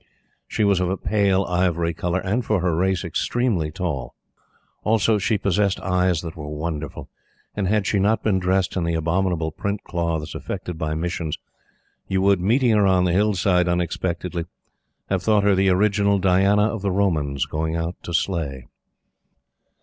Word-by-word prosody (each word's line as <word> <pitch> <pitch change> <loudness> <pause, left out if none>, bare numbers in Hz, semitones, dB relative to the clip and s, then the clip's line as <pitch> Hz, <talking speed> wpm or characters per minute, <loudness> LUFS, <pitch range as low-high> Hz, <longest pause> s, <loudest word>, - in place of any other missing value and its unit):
She - - -1
was 100 -2 +3
of 90 -1 0
a 95 - -1
pale, 100 -2 +1
ivory 85 -2 0
color 90 +3 -2
and, 105 +6 -1
for 105 -4 +1
her 90 -2 0
race, 95 0 +1
extremely 115 -11 0
tall. 80 -7 -4 0.7
Also, 110 0 +2
she 105 +2 +1
possessed 100 0 +1
eyes 90 -3 +1
that 80 -2 -6
were 75 -2 -7
wonderful; 75 0 -5 0.5
and, 100 -2 -1
had 105 0 +1
she 100 - +1
not 105 +3 +2
been 100 -4 +2
dressed 95 +1 0
in 90 - 0
the 85 0 0
abominable 85 0 0
print 100 +6 -4
cloths 85 -3 -2
affected 90 - -5
by 80 -1 -3
Missions, 85 -1 -3 0.7
you 95 - 0
would, 100 -1 +4
meeting 120 +6 +3
her 105 -2 +4
on 95 -1 +3
the 90 - +2
hill 105 +2 +2
side 90 -1 +2
unexpectedly, 85 0 -2 0.7
have 95 -2 +1
thought 105 0 +3
her 100 0 +4
the 95 0 +3
original 100 +1 +3
Diana 95 +2 +3
of 110 -1 -1
the 100 - 0
Romans 75 -8 0
going 80 +2 -2
out 85 +1 -2
to - - -7
slay. 80 -7 -2
90 Hz, 170 wpm, -22 LUFS, 85-100 Hz, 0.7 s, would